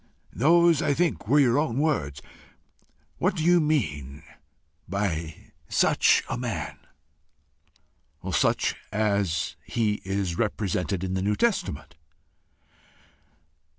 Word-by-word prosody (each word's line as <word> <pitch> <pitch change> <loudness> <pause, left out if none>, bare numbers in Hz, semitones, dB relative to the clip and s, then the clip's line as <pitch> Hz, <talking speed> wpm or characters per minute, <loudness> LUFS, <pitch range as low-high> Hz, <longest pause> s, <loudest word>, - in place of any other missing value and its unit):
Those, 170 - +4
I 145 - +1
think, 140 - -1
were 145 +6 +4
your 130 -1 +4
own 140 -6 -1
words: 75 - -1 1.0
what - - +1
do 155 - -2
you 175 +1 +5
mean 75 - -2 0.7
by 85 -5 -2 0.3
SUCH - - +3
a 120 - -3
man?" 115 -11 -4 1.5
"Such - - +1 0.2
as 100 -6 0
he 105 -3 -1
is 95 -3 -2
represented 100 -3 -1
in 95 0 -2
the 95 - -1
New 105 +2 +1
Testament." 130 - -1
105 Hz, 105 wpm, -26 LUFS, 90-145 Hz, 1.5 s, you